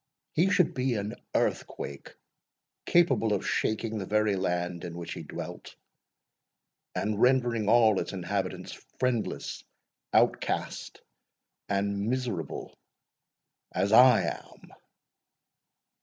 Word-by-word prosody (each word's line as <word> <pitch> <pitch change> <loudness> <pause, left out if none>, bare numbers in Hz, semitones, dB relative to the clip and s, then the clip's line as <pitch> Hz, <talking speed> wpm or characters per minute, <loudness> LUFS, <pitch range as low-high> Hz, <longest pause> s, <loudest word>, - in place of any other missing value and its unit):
he 175 +5 +3
should 180 -4 +3
be 130 -1 0
an 105 0 -3 0.2
earthquake 70 - -2 0.7
capable 170 -11 +3
of 100 - -1
shaking 110 0 -1
the 95 - -4
very 105 -1 +2
land 90 -1 -2
in 85 -1 -6
which 85 -1 -5
he - - -6
dwelt, - - -8 1.2
and 105 0 -1
rendering 120 -4 +3
all 110 -3 +5
its - - -3
inhabitants 95 0 -3 0.3
friendless, 125 -4 -1 0.5
outcast, - - 0 0.7
and 100 +1 0
miserable 125 -9 -3 1.0
as 100 - 0
I 125 +1 +7
am!" - - -7
105 Hz, 100 wpm, -28 LUFS, 100-125 Hz, 1.2 s, I